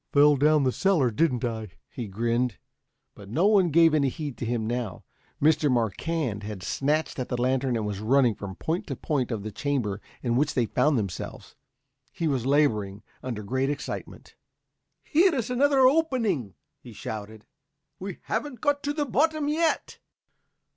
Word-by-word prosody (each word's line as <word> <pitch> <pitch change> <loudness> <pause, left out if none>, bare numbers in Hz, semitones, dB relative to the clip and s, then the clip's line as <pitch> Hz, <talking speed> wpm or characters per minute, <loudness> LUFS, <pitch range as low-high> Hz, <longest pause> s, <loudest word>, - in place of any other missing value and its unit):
"Fell 145 +1 +6
down 150 +1 +4
the 130 - +2
cellar, 160 -7 +2
didn't 125 0 +1
I?" 110 -2 -3 0.2
he 120 -4 -6
grinned. 115 +2 -1 0.6
But 100 -1 -13
no 160 - +1
one 200 -4 +4
gave 165 +1 +5
any 140 -3 +3
heed 145 -2 -5
to 115 - -3
him 115 -2 -1
now. 115 -4 -3 0.4
Mr. 150 -1 +3
Marquand 120 - -1
had 105 -3 -7
snatched 150 +6 -1
at 125 - -3
the 125 - -2
lantern 130 0 +1
and 110 -2 -1
was 105 -2 -3
running 125 +2 +3
from 100 -2 -7
point 170 - -3
to - - -3
point 140 -6 -1
of 110 -5 -3
the 110 - -5
chamber 110 -4 -2 0.2
in 120 -2 0
which 145 +4 +1
they 120 - +2
found 150 +5 +2
themselves. 100 -6 -5 0.6
He 165 - -2
was 130 -4 0
laboring 110 -9 +1 0.2
under 115 -5 -5
great 130 +6 0
excitement. 145 -1 -6 0.7
"Here's 305 - +2
another 275 +2 +3
opening," 255 - +2 0.2
he - - -12
shouted. 110 0 -7 0.5
"We 190 -1 -6
haven't 285 -6 -3
got 285 +2 +1
to 290 - -2
the 295 -1 -1
bottom 300 +3 +1
yet." 320 +2 0
135 Hz, 165 wpm, -26 LUFS, 115-170 Hz, 0.7 s, Fell